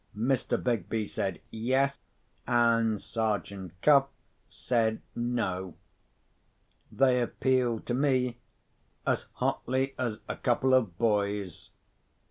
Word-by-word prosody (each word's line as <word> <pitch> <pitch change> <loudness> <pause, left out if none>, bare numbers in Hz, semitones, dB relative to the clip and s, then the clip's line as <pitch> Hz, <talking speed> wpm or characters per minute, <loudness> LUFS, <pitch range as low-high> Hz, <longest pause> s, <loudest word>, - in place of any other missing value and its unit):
Mr. 130 +4 +1
Begbie 110 -2 -1
said, 95 -5 -3
Yes; 130 +5 +1 0.5
and 115 -3 +3
Sergeant 100 -5 -3
Cuff 140 -2 +6 0.4
said, 115 -3 0 0.2
No. 95 -7 -2 1.2
They 130 -2 +3
appealed 120 -1 0
to 120 - -2
me, 125 -2 +1 0.7
as - - 0
hotly 130 +2 -1
as 115 -4 -2
a - - -4
couple 130 +1 +2
of 110 -9 +2
boys. 100 -4 -1
115 Hz, 95 wpm, -29 LUFS, 105-130 Hz, 1.2 s, Cuff